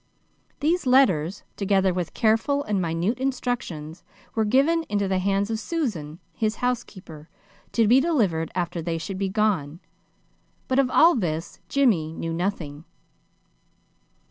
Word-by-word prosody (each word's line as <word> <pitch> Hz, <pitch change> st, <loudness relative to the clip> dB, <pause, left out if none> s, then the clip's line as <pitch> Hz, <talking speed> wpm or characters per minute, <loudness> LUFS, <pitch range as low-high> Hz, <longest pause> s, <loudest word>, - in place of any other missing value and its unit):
These 320 Hz, 0 st, +1 dB
letters, 200 Hz, -, +3 dB
together 195 Hz, -2 st, +2 dB
with 175 Hz, -2 st, -4 dB
careful 230 Hz, +6 st, +2 dB
and 205 Hz, -6 st, -1 dB
minute 175 Hz, +8 st, -1 dB
instructions, 240 Hz, -, -3 dB, 0.3 s
were 220 Hz, -1 st, +1 dB
given 280 Hz, +9 st, +3 dB
into 205 Hz, -1 st, 0 dB
the 190 Hz, -1 st, +1 dB
hands 200 Hz, +2 st, 0 dB
of 220 Hz, -, -1 dB
Susan, 215 Hz, -, -3 dB, 0.2 s
his 215 Hz, -1 st, -1 dB
housekeeper, 190 Hz, -11 st, -4 dB, 0.4 s
to 230 Hz, -2 st, +3 dB
be 245 Hz, +5 st, +6 dB
delivered 215 Hz, -, +1 dB
after 175 Hz, -1 st, -2 dB
they 165 Hz, 0 st, -2 dB
should 185 Hz, +4 st, -5 dB
be 195 Hz, -1 st, 0 dB
gone. 190 Hz, -7 st, 0 dB, 0.9 s
But 260 Hz, +1 st, +2 dB
of 265 Hz, -2 st, +3 dB
all 335 Hz, +6 st, +6 dB
this 165 Hz, -7 st, -3 dB
Jimmy 200 Hz, -, +2 dB
knew 165 Hz, 0 st, -4 dB
nothing. 165 Hz, -5 st, -3 dB
200 Hz, 135 wpm, -24 LUFS, 165-250 Hz, 0.9 s, be